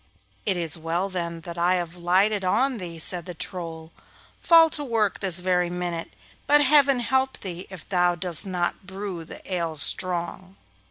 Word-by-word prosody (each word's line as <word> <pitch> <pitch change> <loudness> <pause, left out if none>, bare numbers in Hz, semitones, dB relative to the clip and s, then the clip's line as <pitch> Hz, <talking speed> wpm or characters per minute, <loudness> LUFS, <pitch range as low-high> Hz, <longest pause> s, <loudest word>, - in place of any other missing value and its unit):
'It 190 -3 +1
is 165 -2 -1
well 170 +4 -2
then 170 -3 -4
that 170 0 -8
I 175 +2 +3
have 175 -1 -4
lighted 190 +4 +1
on 235 +7 +1
thee,' 170 -3 -6
said 175 +2 +1
the 180 - -7
Troll. 165 -2 -6 0.5
'Fall 330 -1 +6
to 295 - -1
work 225 -6 0
this 190 -3 +4
very 180 -1 +1
minute, 175 -6 -4 0.3
but 295 0 +5
Heaven 275 -2 +5
help 265 +3 0
thee 180 -1 -7
if 190 -4 -11
thou 180 -2 +2
dost 175 -1 +2
not 180 -1 -3
brew 190 -3 -6
the 160 - -11
ale 170 -3 -2
strong. 180 +4 -1
180 Hz, 170 wpm, -24 LUFS, 170-200 Hz, 0.5 s, Fall